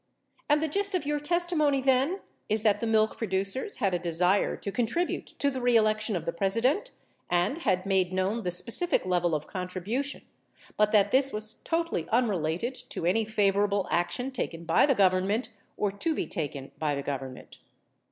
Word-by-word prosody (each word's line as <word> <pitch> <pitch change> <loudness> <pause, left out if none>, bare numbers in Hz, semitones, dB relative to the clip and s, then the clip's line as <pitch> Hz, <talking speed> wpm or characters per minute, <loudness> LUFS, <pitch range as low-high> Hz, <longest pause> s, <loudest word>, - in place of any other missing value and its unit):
And 295 +1 +3
the - - +1
gist 400 +5 -1
of 350 - -1
your 295 0 0
testimony, 305 -3 +1
then, 270 +8 +2 0.3
is 215 0 +1
that 210 -3 +3
the 230 - -2
milk 220 -1 +2
producers 200 - -1
had 195 -6 0
a 175 - +1
desire 180 +3 +1
to 200 - -5
contribute 245 - -1
to 280 - +1
the 260 -1 -4
reelection 215 -3 +3
of 175 - -3
the 170 - -2
President, 230 - +1 0.4
and 175 - +1
had 185 - 0
made 190 -2 +2
known 190 +5 0
the 180 - -2
specific 230 - +1
level 175 -3 +1
of 150 0 -3
contribution, 195 +10 -3 0.5
but 210 0 +3
that 205 -2 +4
this 270 +1 +3
was 215 +1 -2
totally 330 - -2
unrelated 210 -2 0 0.2
to - - -4
any 215 +6 +2
favor 205 -2 +2
able 200 -2 -1
action 175 +10 0
taken 170 -10 -4
by 165 - +4
the 275 - +3
Government 195 +4 +2 0.3
or 205 -1 0
to 315 +11 -1
be - - -1
taken 145 -6 -4
by 150 -2 0
the 140 - -4
Government. 135 -2 -6
210 Hz, 180 wpm, -28 LUFS, 180-265 Hz, 0.5 s, that